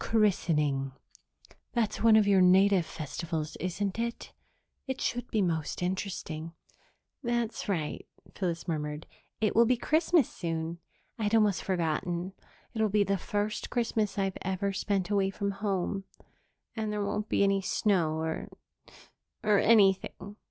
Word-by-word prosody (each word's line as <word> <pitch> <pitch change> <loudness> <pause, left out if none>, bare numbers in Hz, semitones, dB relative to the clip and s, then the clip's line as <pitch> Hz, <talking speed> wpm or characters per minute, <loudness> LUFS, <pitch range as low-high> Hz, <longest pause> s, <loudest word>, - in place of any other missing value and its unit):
"Christening 150 -11 +1 0.8
that's 235 -4 0
one 225 0 +6
of 215 -1 +6
your 195 -2 +5
native 185 -1 +5
festivals, 155 +1 -4
isn't 190 +3 -2
it? 235 0 -4 0.5
It 265 0 -3
should 245 +1 -2
be 215 -3 +1
most 160 -1 -1
interesting." 175 -3 -3 0.7
"That's 235 -4 -2
right," 160 -6 -2 0.3
Phyllis 175 -3 -3
murmured. 150 -2 -3 0.4
"It 215 - +1
will 230 +1 +6
be 250 +1 +3
Christmas 315 +1 +3
soon. 165 -1 -4 0.4
I'd 215 0 +1
almost 210 -4 +3
forgotten. 175 +1 -1 0.4
It'll 220 -2 +1
be 205 +1 +3
the 195 -1 0
first 205 +4 -2
Christmas 225 -4 0
I've 195 -1 -1
ever 190 +1 -1
spent 195 -1 -1
away 195 -2 +2
from 200 +1 -2
home. 195 -1 -2 0.7
And 220 -2 -2
there 210 -1 -1
won't 210 +1 -2
be - - +3
any 195 0 +3
snow 180 -5 +1
or 160 0 -3 1.0
or 210 -2 +4
anything." 200 -1 +3
195 Hz, 135 wpm, -29 LUFS, 170-215 Hz, 1.0 s, one